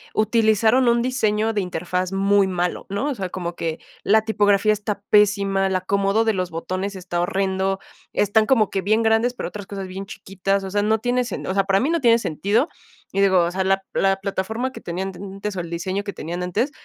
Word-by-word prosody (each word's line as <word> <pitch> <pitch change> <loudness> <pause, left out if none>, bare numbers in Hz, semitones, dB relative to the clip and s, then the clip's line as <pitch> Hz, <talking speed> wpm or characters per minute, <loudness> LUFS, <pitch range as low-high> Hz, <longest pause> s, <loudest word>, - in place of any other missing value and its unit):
utilizaron 220 +2 +3
un 235 0 +3
diseño 225 -3 +1
de 205 - 0
interfaz 180 +1 -2
muy 195 0 +3
malo, 180 -1 -2
¿no?, 200 +9 -1
o 280 - -2
sea, 190 -4 -4
como 175 -1 -5
que 165 -1 -3 0.2
la 220 +2 +4
tipografía 210 -1 +3
está 210 -1 -4
pésima, 200 -2 +3
el 190 - -1
acomodo 195 +4 +1
de 220 - +2
los 185 -2 -2
botones 185 +4 -4
está 180 -2 -4
horrendo, 190 +1 0 0.3
están 210 +2 +2
como 225 -6 +3
que 195 - -1
bien 215 +4 +2
grandes, 225 +2 +2
pero - - -4
otras 205 -2 -8
cosas 195 -1 -6
bien 190 +1 -6
chiquitas, 195 0 -2
o 190 - -5
sea, 205 +1 +1
no 215 +2 +2
tiene 245 +2 +1
sen 240 - -5
o 185 - -2
sea, 195 0 +2
para 195 0 +3
mí 270 - 0
no 335 -1 0
tiene 230 -2 +5
sentido, 215 - 0 0.4
y 195 - 0
digo, 190 -2 +4
o 170 - -1
sea, 190 +1 -1
la 195 0 +1
la 195 0 +2
plataforma 200 +6 -3
que - - -10
tenían 185 +3 -4
antes 195 +2 -6
o - - -3
el 170 - -8
diseño 185 +4 -3
que 200 -1 -5
tenían 175 +3 -5
antes, 205 - -1
195 Hz, 215 wpm, -22 LUFS, 190-220 Hz, 0.4 s, tiene